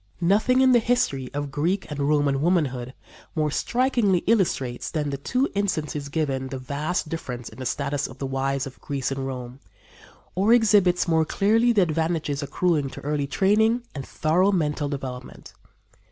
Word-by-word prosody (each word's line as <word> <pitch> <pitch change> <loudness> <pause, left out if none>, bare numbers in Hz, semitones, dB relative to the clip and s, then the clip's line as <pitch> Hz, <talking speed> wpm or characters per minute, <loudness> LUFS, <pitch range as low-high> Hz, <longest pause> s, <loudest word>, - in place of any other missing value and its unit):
Nothing 215 +9 +3
in 260 -1 +5
the 240 - +6
history 140 - 0
of 145 -1 -4
Greek 170 +8 0
and 145 - -4
Roman 140 -1 +2
womanhood 140 -7 0 0.4
more 155 -2 0
strikingly 235 - +1
illustrates 170 - 0
than 150 -3 -2
the 140 - -3
two 255 - 0
instances 155 -8 -2
given 135 -3 -1
the 130 0 -5
vast 150 +7 -3
difference 125 -7 -5
in 110 - -14
the 130 - -3
status 140 +2 -2
of 130 - -12
the 135 - -4
wives 135 0 -1
of 135 -1 -11
Greece 140 -3 -3
and 135 0 -3
Rome, 125 -1 -7 0.7
or 200 +5 +3
exhibits 205 -7 +4
more 160 -1 +3
clearly 225 +8 +2
the 210 -5 +4
advantages 160 -3 -1
accruing 145 0 0
to - - -10
early 145 -1 -1
training 215 - +2
and 140 - -5
thorough 170 +9 +1
mental 150 -5 0
development. 130 -3 -7
150 Hz, 165 wpm, -24 LUFS, 135-190 Hz, 0.7 s, the